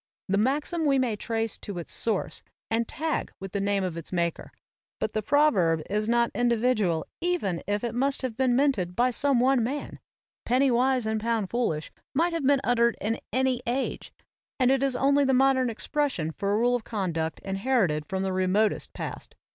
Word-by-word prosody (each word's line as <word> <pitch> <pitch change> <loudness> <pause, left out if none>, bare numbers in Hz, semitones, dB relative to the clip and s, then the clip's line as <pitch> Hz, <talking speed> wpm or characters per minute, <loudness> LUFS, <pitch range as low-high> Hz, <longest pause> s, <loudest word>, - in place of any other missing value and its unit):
The 200 +1 +1
maxim 295 +7 0
we 275 -1 +3
may 250 -4 +1
trace 225 +1 -2
to 200 -3 -6
its 170 - -6
source 220 -4 -2 0.3
and 230 0 +1
tag 315 +2 -2
with 195 -1 -7
the 200 - -2
name 200 -1 +1
of 180 -3 -3
its 165 -1 -7
maker, 170 -2 -2 0.5
but 215 - -1
the 215 - 0
proverb 200 - +3
is 210 +2 0
not 235 0 +2
individual 230 -8 +1 0.2
even 330 - -1
if 205 +2 -1
it 235 - -2
must 270 +3 0
have 250 -4 -3
been 255 -1 +2
minted 240 -11 +1
by 245 +2 +3
some 275 +1 +2
one 255 -1 +3
man. 275 +5 -4 0.4
"Penny 260 +2 +2
wise 250 0 +2
and 220 0 -1
pound 225 -4 -1
foolish" 195 -11 -1 0.2
might 335 +4 +2
have 320 -5 -1
been 280 -1 +4
uttered 235 -1 +2
in 225 +2 -1
any 260 -1 +1
age; 255 +3 -2 0.5
and 255 0 +4
it 270 -1 +2
is 270 -2 +1
only 280 +2 +3
the 265 -1 +3
modern 260 -1 +3
expression 230 - -1
for 200 +5 -2
a 205 - +2
rule 240 +2 +2
of 245 - -3
conduct 170 -8 -2
inherited 195 - 0
from 190 0 -2
the 190 -1 -1
remotest 185 +3 +1
past. - - -7
235 Hz, 190 wpm, -27 LUFS, 200-265 Hz, 0.5 s, been